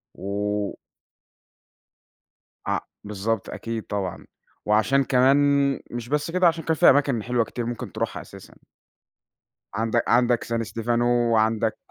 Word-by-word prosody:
و 100 +1 -2 1.9
آه، - - 0 0.2
بالضبط 105 +1 -3
أكيد، 115 -1 -5
طبعًا، 100 -3 -4 0.4
وعشان 110 +6 +3
كمان 130 +1 +4 0.5
مش 120 0 -6
بس 150 +2 -1
كده، 185 0 +4
عشان 165 -1 0
كان 160 - 0
في - - +6
أماكن 135 -5 +2
حلوة 120 0 +1
كتير 120 +2 -5
ممكن 120 -1 -5
تروحها - - -3
أساسًا. - - -14 1.2
عند 115 +2 +1
عندك 120 0 +3
سان 115 0 -2
ستيفانو، 115 +2 -1 0.3
وعندك 110 0 +1
115 Hz, 120 wpm, -24 LUFS, 110-130 Hz, 1.9 s, في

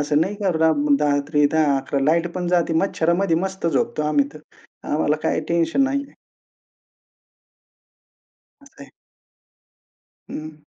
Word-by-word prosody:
असं 145 +1 +1
नाही 190 +5 0
की - - -2
रात्री 145 -1 +2
10, 155 -3 +3
11 135 +1 -2
लाईट 165 +3 +2
पण 180 -1 -3
जाते 175 -2 +1
मच्छरामध्ये 170 -1 +1
मस्त 190 0 -3
झोपतो 140 -2 0
आम्ही 145 -2 +2
तर - - -10 0.5
आम्हाला 150 0 +1
काही - - 0
टेन्शन 170 +8 +1
नाहीये. 280 +1 -3 2.5
असं 280 - -16
आहे. - - -15 1.4
हं. 155 -1 -8
160 Hz, 115 wpm, -21 LUFS, 145-175 Hz, 2.5 s, 10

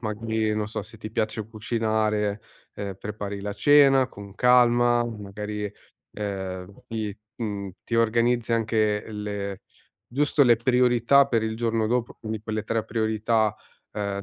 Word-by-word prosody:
magari 110 0 -1
non 105 -1 -1
so 105 - -4
se 110 +1 -13
ti 110 0 -7
piace 110 -1 -2
cucinare, 110 -2 0 0.3
ehm, 100 -2 -5
prepari 100 -1 -5
la 100 +1 -4
cena 135 +2 +5
con 100 -1 -11
calma, 120 0 +4
magari, 105 -1 -5 0.4
ehm, 95 -2 -5
ti, 110 -2 -4 0.2
mhmm, 100 -4 -4
ti 115 - -3
organizzi 115 +1 +2
anche 110 -2 +1
le 100 -2 -4 0.4
giusto 145 +3 +2
le 120 -3 +6
priorità 125 +2 +4
per 115 -3 +1
il 110 0 -2
giorno 115 -1 0
dopo, 120 0 -1
quindi 110 -1 -4
quelle 110 -1 -3
tre 110 0 -1
priorità, 110 -1 +1 0.4
ehm, 100 -1 -3
110 Hz, 140 wpm, -25 LUFS, 105-120 Hz, 0.4 s, le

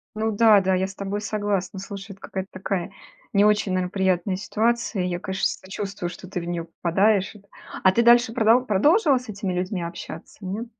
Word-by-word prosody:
Ну 220 +1 0
да-да, 205 -3 +5
я 185 +1 +1
с 195 - -10
тобой 200 +1 -4
согласна. 205 -2 -2
Слушай, 200 +1 -8
это 195 - -15
какая-то 190 0 -6
такая 185 -1 -3 0.4
не 200 0 +4
очень, 210 -2 +2
наверно, 185 -1 0
приятная 190 -1 0
ситуация. 220 0 0
Я, 175 -1 -2
конечно, 190 +1 -2
сочувствую, 195 -1 -4
что 180 +1 -11
ты 180 - -4
в - - -6
неё 170 -1 -3
попадаешь. 190 +5 +1 0.5
А 190 - +6
ты 235 - +3
дальше 240 0 +5
продол 235 +2 +4
продолжила 290 - +4
с 250 -2 -13
этими 195 -3 -3
людьми 185 +1 -2
общаться, 170 -1 -8
нет? 205 +6 -4
195 Hz, 185 wpm, -24 LUFS, 185-215 Hz, 0.5 s, А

